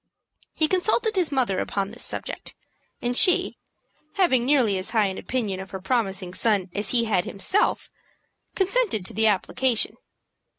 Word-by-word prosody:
He 315 Hz, -, +3 dB
consulted 430 Hz, +5 st, +1 dB
his 360 Hz, -5 st, +1 dB
mother 245 Hz, -9 st, 0 dB
upon 200 Hz, 0 st, -2 dB
this 240 Hz, -, -4 dB
subject, -, -, -3 dB, 0.5 s
and 245 Hz, 0 st, -1 dB
she, 360 Hz, +6 st, +3 dB, 0.6 s
having 265 Hz, -11 st, +2 dB
nearly 245 Hz, -9 st, +2 dB
as 185 Hz, -, -5 dB
high 220 Hz, -3 st, +2 dB
an 190 Hz, -1 st, -3 dB
opinion 215 Hz, -7 st, -3 dB
of 190 Hz, 0 st, -8 dB
her 190 Hz, -, -6 dB
promising 195 Hz, -5 st, -2 dB
son 195 Hz, -4 st, +1 dB
as 205 Hz, 0 st, -1 dB
he 235 Hz, -2 st, +3 dB
had 190 Hz, -5 st, 0 dB
himself, 375 Hz, -, 0 dB, 0.6 s
consented 385 Hz, -, +1 dB
to -, -, -3 dB
the 220 Hz, +2 st, +3 dB
application. 220 Hz, +4 st, +1 dB
230 Hz, 155 wpm, -24 LUFS, 195-295 Hz, 0.6 s, He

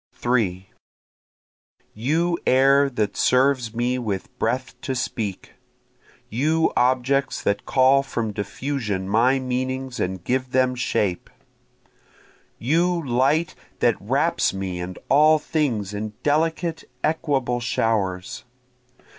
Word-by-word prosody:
3 100 Hz, -7 st, -1 dB, 1.3 s
You 165 Hz, +10 st, 0 dB
air 135 Hz, +2 st, +5 dB
that 105 Hz, -5 st, -2 dB
serves 125 Hz, -3 st, +2 dB
me 125 Hz, +2 st, 0 dB
with 105 Hz, -6 st, -4 dB
breath 130 Hz, +3 st, -1 dB
to 130 Hz, -, -3 dB
speak! 110 Hz, -6 st, -4 dB, 0.7 s
You 155 Hz, +8 st, +1 dB
objects 130 Hz, +2 st, +1 dB
that 100 Hz, 0 st, -1 dB
call 135 Hz, +1 st, +4 dB
from 115 Hz, -5 st, -3 dB
diffusion 105 Hz, -1 st, -3 dB
my 120 Hz, +6 st, +3 dB
meanings 130 Hz, 0 st, -3 dB
and 90 Hz, -1 st, -2 dB
give 130 Hz, +4 st, -1 dB
them 130 Hz, 0 st, +3 dB
shape! 100 Hz, -7 st, -1 dB, 1.3 s
You 170 Hz, +5 st, +1 dB
light 135 Hz, +7 st, +2 dB, 0.2 s
that -, -, +3 dB
wraps -, -, +1 dB
me 95 Hz, -2 st, -4 dB
and 90 Hz, +1 st, -6 dB
all 155 Hz, +3 st, +5 dB
things 125 Hz, -, -1 dB
in 105 Hz, +1 st, -4 dB
delicate 160 Hz, +2 st, 0 dB, 0.2 s
equable 140 Hz, -6 st, 0 dB
showers! 100 Hz, -6 st, -1 dB
125 Hz, 105 wpm, -23 LUFS, 105-140 Hz, 1.3 s, air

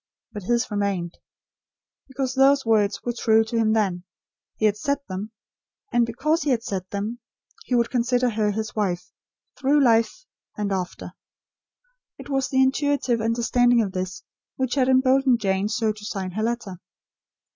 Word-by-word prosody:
But 205 Hz, -, -6 dB
his 235 Hz, +4 st, 0 dB
remained. 200 Hz, -4 st, -2 dB, 0.9 s
Because 265 Hz, -1 st, -3 dB
those 275 Hz, 0 st, +4 dB
words 215 Hz, -3 st, +2 dB
were 240 Hz, -, -2 dB
true 225 Hz, -2 st, +3 dB
to 225 Hz, +1 st, -6 dB
him 220 Hz, -1 st, +2 dB
then, 190 Hz, -5 st, 0 dB, 0.5 s
he 215 Hz, -, +1 dB
had 210 Hz, -1 st, +3 dB
said 280 Hz, +7 st, -1 dB
them; 195 Hz, +3 st, -5 dB, 0.6 s
and, 240 Hz, -1 st, +3 dB
because 305 Hz, +8 st, 0 dB
he 295 Hz, -, -1 dB
had 235 Hz, -3 st, +1 dB
said 185 Hz, -3 st, -4 dB
them, 210 Hz, +4 st, -4 dB, 0.5 s
he 250 Hz, -, 0 dB
would 235 Hz, -1 st, +1 dB
consider 245 Hz, 0 st, +1 dB
her 215 Hz, -1 st, 0 dB
his 220 Hz, +2 st, -3 dB
wife, 180 Hz, -4 st, -2 dB, 0.5 s
through 285 Hz, +2 st, +3 dB
life, 230 Hz, -, +2 dB, 0.3 s
and 205 Hz, -1 st, -2 dB
after. 185 Hz, -2 st, -4 dB, 1.0 s
It -, -, -11 dB
was 270 Hz, -1 st, 0 dB
the 265 Hz, -1 st, +3 dB
intuitive 265 Hz, -3 st, +1 dB
understanding 235 Hz, +1 st, +2 dB
of 195 Hz, -, -4 dB
this, 185 Hz, +2 st, -5 dB, 0.3 s
which 260 Hz, -2 st, -1 dB
had 265 Hz, -2 st, +2 dB
emboldened 260 Hz, -1 st, +4 dB
Jane 195 Hz, -1 st, 0 dB
so 220 Hz, -1 st, 0 dB
to 210 Hz, 0 st, -11 dB
sign 195 Hz, -3 st, -4 dB
her 215 Hz, +4 st, -3 dB
letter. 225 Hz, -5 st, -3 dB
225 Hz, 160 wpm, -24 LUFS, 205-255 Hz, 1.0 s, those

